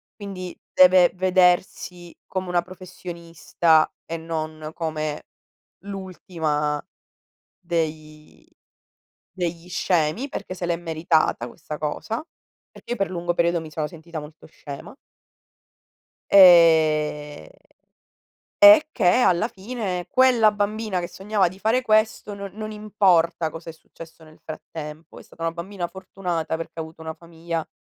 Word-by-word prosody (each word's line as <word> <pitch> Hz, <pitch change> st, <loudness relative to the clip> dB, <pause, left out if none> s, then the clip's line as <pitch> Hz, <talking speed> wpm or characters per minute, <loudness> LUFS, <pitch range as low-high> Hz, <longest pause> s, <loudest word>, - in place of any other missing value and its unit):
quindi 185 Hz, -4 st, -7 dB, 0.2 s
deve 185 Hz, -1 st, +6 dB
vedersi 180 Hz, -1 st, +1 dB
come 185 Hz, 0 st, -4 dB
una 175 Hz, -1 st, +1 dB
professionista, 170 Hz, -3 st, -1 dB
e 165 Hz, -, -5 dB
non 155 Hz, -1 st, -5 dB
come 155 Hz, -2 st, -3 dB, 0.6 s
l'ultima 165 Hz, -6 st, -3 dB, 0.7 s
dei 155 Hz, -3 st, -5 dB, 0.9 s
degli 175 Hz, -1 st, -4 dB
scemi, 175 Hz, -, 0 dB
perché 185 Hz, -, -6 dB
se 175 Hz, -1 st, -4 dB
l'è 170 Hz, -1 st, 0 dB
meritata 160 Hz, -6 st, 0 dB
questa 150 Hz, +3 st, -8 dB
cosa, 220 Hz, -, -3 dB, 0.5 s
perché -, -, -15 dB
io 240 Hz, -, -1 dB
per 195 Hz, -, 0 dB
lungo 175 Hz, -1 st, -2 dB
periodo 170 Hz, 0 st, +1 dB
mi 155 Hz, -, -10 dB
sono 155 Hz, 0 st, -3 dB
sentita 165 Hz, 0 st, -8 dB
molto 150 Hz, +2 st, -13 dB
scema. 145 Hz, -, -10 dB, 1.4 s
Ehm, 160 Hz, -5 st, +5 dB, 1.2 s
e 305 Hz, 0 st, +9 dB
che 205 Hz, -10 st, 0 dB
alla 210 Hz, 0 st, +3 dB
fine, 195 Hz, -4 st, -5 dB
quella 245 Hz, -5 st, +5 dB
bambina 205 Hz, -1 st, -2 dB
che 175 Hz, -, -5 dB
sognava 195 Hz, -1 st, 0 dB
di 185 Hz, -, -13 dB
fare 225 Hz, +5 st, +2 dB
questo, 215 Hz, -2 st, +1 dB
non 200 Hz, 0 st, -7 dB
non 215 Hz, 0 st, -6 dB
importa 190 Hz, -6 st, +2 dB
cosa 165 Hz, +1 st, -9 dB
è -, -, -9 dB
successo 165 Hz, 0 st, -15 dB
nel 155 Hz, 0 st, -17 dB
frattempo, 155 Hz, 0 st, -9 dB
è -, -, -12 dB
stata 165 Hz, -, -13 dB
una 165 Hz, 0 st, 0 dB
bambina 175 Hz, +1 st, -5 dB
fortunata, 175 Hz, -3 st, -4 dB
perché 165 Hz, -, -7 dB
ha 160 Hz, -, -1 dB
avuto 160 Hz, +1 st, -12 dB
una 160 Hz, 0 st, -6 dB
famiglia 165 Hz, 0 st, -6 dB
170 Hz, 125 wpm, -23 LUFS, 160-190 Hz, 1.4 s, e